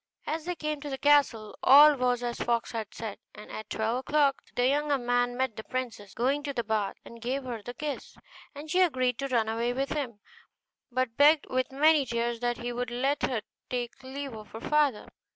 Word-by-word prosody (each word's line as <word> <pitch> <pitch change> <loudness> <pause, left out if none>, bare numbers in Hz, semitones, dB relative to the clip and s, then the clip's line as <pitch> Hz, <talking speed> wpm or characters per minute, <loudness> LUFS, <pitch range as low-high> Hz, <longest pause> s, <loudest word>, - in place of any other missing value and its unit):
As 315 0 -3
they 355 0 -2
came 305 -2 -3
to 290 - -5
the 270 - -3
castle, 275 -7 +3
all 290 +3 +8
was 250 -2 0
as 240 0 -3
the - - -2
fox 235 -1 0
had 220 -3 -4
said, 220 -3 -6 0.2
and 210 - -11
at 215 - -7
twelve 220 +2 -1
o'clock 285 +1 +2
the 245 0 +3
young 295 +2 +1 0.2
man 245 0 +1
met 260 -4 0
the 220 - -7
princess 225 -6 -5
going 270 +5 +1
to 285 -1 -4
the 235 - -1
bath 215 -2 -1
and 235 0 -12
gave 260 +4 -2
her 240 -4 -5
the 245 +4 -8
kiss, 300 -2 -5 0.4
and 300 +2 -8
she 370 - +3
agreed 255 -8 +2
to 275 - -1
run 235 -4 +1
away 230 +2 0
with 270 +2 -1
him, 255 -8 -3 0.7
but 255 -2 -1
begged 295 +1 +6
with 255 0 0
many 300 +2 +4
tears 235 0 -1
that 240 0 -1
he 240 0 -4
would 245 0 -3
let 265 +4 0
her 230 -5 -1 0.3
take 245 -1 -4
leave 270 0 -6
of 215 -1 -9
her 225 - -6
father. 295 -7 +1
250 Hz, 215 wpm, -28 LUFS, 235-285 Hz, 0.7 s, all